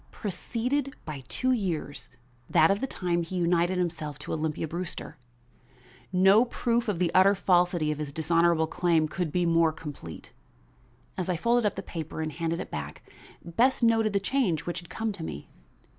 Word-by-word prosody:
preceded 250 +7 -3
by 150 -4 -6
two 255 0 0
years 175 - -2 0.4
that 160 +4 +5
of 200 - 0
the 270 - -1
time 175 -7 -1
he 170 +2 -5
united 175 +1 +2
himself 160 -5 -2
to 150 - -6
Olympia 160 0 -2
Brewster. 170 0 -5 1.0
No 190 +4 +6
proof 235 -1 -1
of 205 -4 0
the 170 -1 +1
utter 195 +2 +6
falsity 175 -4 +2
of 150 - -4
his 150 -2 -4
dishonorable 165 +1 +2
claim 165 -1 +1
could 175 0 -3
be 180 +1 +1
more 165 -1 +4
complete. 145 - -9 0.9
As 185 - -2
I 180 - +1
folded 235 +4 +2
up - - -2
the 195 - -5
paper 160 -3 -6
and 155 -1 -2
handed 165 +2 -2
it - - -6
back, 75 0 -6 0.4
Bess 240 +10 +2
noted 225 -2 +3
the 200 - +3
change 200 - 0
which 175 - -3
had 175 -2 -14
come 220 +4 -2
to 195 -5 -7
me. 75 - -7
175 Hz, 175 wpm, -28 LUFS, 160-200 Hz, 1.0 s, No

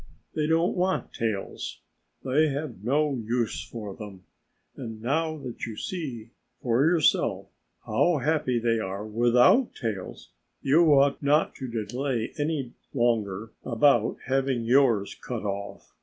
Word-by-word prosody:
They 150 -1 0
don't 165 +2 +2
want 185 +1 -1
tails. 110 -4 -3 0.4
They 150 +5 +3
have 140 - -4
no 145 +4 +2
use 115 +1 -1
for 105 -4 -7
them. 100 -3 -10 0.5
And 115 -4 -7
now 155 +7 0
that 130 -5 -6
you 110 -2 -7
see 125 -11 -5 0.3
for 120 +2 +2
yourself 165 0 +2 0.4
how 175 -2 +2
happy 145 -3 +1
they 115 -1 +1
are 100 0 -4
without 120 - +4
tails, 110 -7 -5 0.3
you 155 +4 +5
ought 140 0 +4
not 150 +2 +2
to 130 - -5 0.2
delay 125 -2 -2
any 145 -5 -2 0.2
longer 110 -4 0
about 120 -1 +3
having 135 -2 0
yours 120 -4 +3
cut 120 -4 -6
off. 100 0 -5
125 Hz, 130 wpm, -27 LUFS, 115-145 Hz, 0.5 s, you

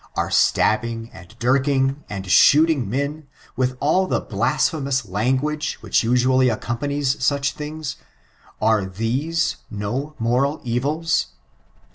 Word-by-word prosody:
Are - - -1
stab 110 - +3
bing, 115 -1 -6
and 90 -1 -14
dirking, 135 +2 +1
and 100 -2 -5
shooting 145 - +4
men 140 +5 -3
— - - -27
^with 130 0 -1
all 185 +7 +2
the - - 0
blasj^bemous 135 -7 0
language 130 +10 -1
which - - +1
iisually 125 +2 +3
accompanies 135 +4 -2
such 140 +1 +1
things 150 0 -6 0.6
^are 105 -4 +1
these 130 - -1
no 120 +9 -4
moral 125 +6 0
evils? 145 +7 0
130 Hz, 120 wpm, -21 LUFS, 115-145 Hz, 0.6 s, shooting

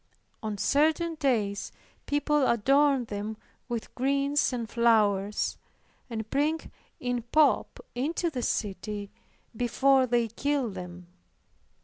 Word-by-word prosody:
On 215 -2 -3
certain 315 - +2
days 230 -10 0 0.4
people 290 -1 +2
adorn 270 +3 +3
them 210 0 -5 0.3
with 235 -2 -4
greens 280 +3 +1
and 235 -3 -3
flowers, 210 -4 +2 0.5
and 220 -2 -4
bring 300 +3 +1 0.4
in 245 -1 -1
pomp 290 +6 +2
into 325 +7 -1
the 255 -4 -3
city 205 -1 -3 0.4
before 260 +3 +3
they 240 -1 +2
kill 270 +1 -1
them. 180 -1 -8
245 Hz, 105 wpm, -28 LUFS, 215-280 Hz, 0.5 s, adorn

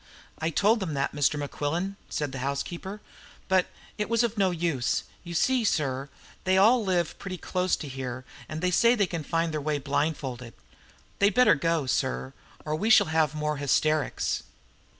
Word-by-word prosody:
"I 160 - 0
told 210 +7 +3
them 170 -7 -3
that, 140 0 -1
Mr. 145 +1 +2
Mequillen," 150 +6 -2
said 145 -3 -2
the 135 - -6
housekeeper, 170 +9 -4 0.5
"but 190 -1 +3 0.3
it 210 - -1
was 230 0 +3
of 230 -1 -1
no 195 -3 +3
use. 165 -8 0 0.2
You 170 -1 -7
see, 255 +7 +2
sir, 140 -8 0 0.3
they 185 0 +3
all 225 +5 +5
live 180 -4 0
pretty 190 -2 -5
close 180 +1 0
to 150 - -7
here, 130 -1 -5 0.2
and 155 0 -5
they 180 0 +1
say 235 +6 +5
they 205 -4 +2
can 170 -3 -4
find 165 +2 -1
their 155 - -2
way 150 0 0
blindfolded. 140 -4 -2 0.6
They'd 200 +1 +3
better 250 0 +6
go, 165 -1 0
sir, 130 0 -1 0.3
or 155 0 -1
we 210 +8 -1
shall 220 - +6
have 155 -1 +2
more 150 0 -1
hysterics." 150 +1 +1
160 Hz, 175 wpm, -27 LUFS, 145-190 Hz, 0.6 s, better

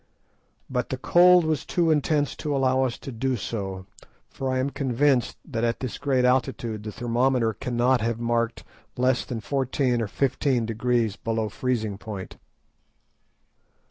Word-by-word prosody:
But 125 -2 -2
the 130 - -2
cold 175 +5 +5
was 155 -2 0
too 170 -2 +1
intense 150 -1 +1
to 150 -2 -2
allow 130 -1 +2
us 120 -2 -3
to 135 - -8
do 130 +2 -1
so, 95 -4 -4 0.5
for 135 - -3
I 130 - 0
am 130 +2 0
convinced 135 -1 +1
that 120 -7 -3
at 115 0 0
this 130 -3 -5
great 130 -3 +1
altitude 120 -4 0
the 105 0 -6
thermometer 120 0 +1
cannot 125 0 +1
have 115 0 -1
marked 115 0 -1 0.3
less 125 0 +2
than 115 -3 -5
fourteen 130 0 0
or 110 - -1
fifteen 130 0 0
degrees 115 -1 0
below 110 -1 -2
freezing 110 -4 -2
point. 100 -4 -7
125 Hz, 150 wpm, -25 LUFS, 115-135 Hz, 0.5 s, cold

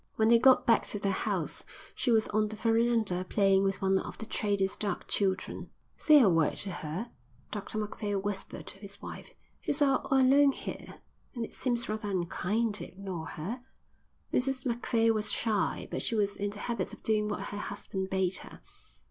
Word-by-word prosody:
When 220 0 +3
they 235 0 +7
got 260 +1 +6
back 230 -2 +4
to - - -1
their 200 0 0
house, 190 - -2 0.3
she - - -1
was 225 -2 +4
on 215 0 +2
the 215 - -6
verandah 225 -4 +2
playing 195 -2 +4
with 195 0 -1
one 190 0 +3
of - - -7
the 220 - -6
trader's 200 -3 0
dark 200 -4 -3
children. 190 -2 -1 0.3
"Say 305 -1 +6
a 245 - +6
word 165 -4 +2
to 195 - -3
her," 175 +8 -5 0.4
Dr 210 +1 -4
Macphail 210 -1 -2
whispered 195 0 -4
to 195 - -8
his 200 0 -11
wife. - - -8 0.3
"She's 285 - -1
all 275 -3 +2
alone 270 +1 +5
here, - - -8 0.3
and 235 -2 -2
it - - -13
seems 240 -2 -1
rather 215 0 -3
unkind 200 +4 0
to - - -5
ignore 185 -4 -6
her." 210 +11 -5 0.7
Mrs 260 +1 +1
Macphail 230 -2 +2
was 215 -1 +2
shy, 215 -4 0
but - - -2
she 230 - -1
was 205 -2 +1
in 205 0 -2
the 205 - -8
habit 210 -3 -3
of - - -12
doing 210 -1 +1
what 205 - -4
her 205 - -5
husband 195 -2 -4
bade 190 -1 +1
her. - - -12
210 Hz, 190 wpm, -30 LUFS, 195-230 Hz, 0.7 s, they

